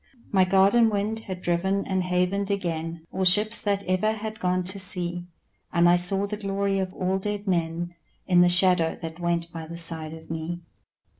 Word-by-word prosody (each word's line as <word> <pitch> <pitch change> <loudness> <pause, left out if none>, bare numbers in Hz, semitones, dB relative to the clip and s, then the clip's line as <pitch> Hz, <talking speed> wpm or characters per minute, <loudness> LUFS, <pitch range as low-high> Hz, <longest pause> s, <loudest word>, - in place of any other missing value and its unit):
My 190 -2 +4
garden 195 +5 +4
wind 210 +1 -2
had 185 -4 -8
driven 190 +3 0
and 190 -1 -1
havened 180 +2 -1
again 165 -4 -4
All 190 - -2
ships 210 +4 +5
that 200 -1 -1
ever 185 +4 0
had 220 0 -7
gone 180 -1 0
to 190 +2 +1
sea, 175 -1 0 0.4
And 170 0 +3
I 175 - +5
saw 195 +3 +3
the 210 +1 -5
glory 195 -1 -2
of 190 -1 -3
all 190 +1 -1
dead 205 +1 -3
men 170 -2 -2 0.3
In 180 -1 +4
the 175 - +5
shadow 180 -2 +4
that 165 +1 -8
went 170 -1 -2
by 165 -1 -7
the 170 +1 -8
side 160 -2 0
of 160 0 -12
me. 165 +2 -5
185 Hz, 190 wpm, -25 LUFS, 170-200 Hz, 0.4 s, ships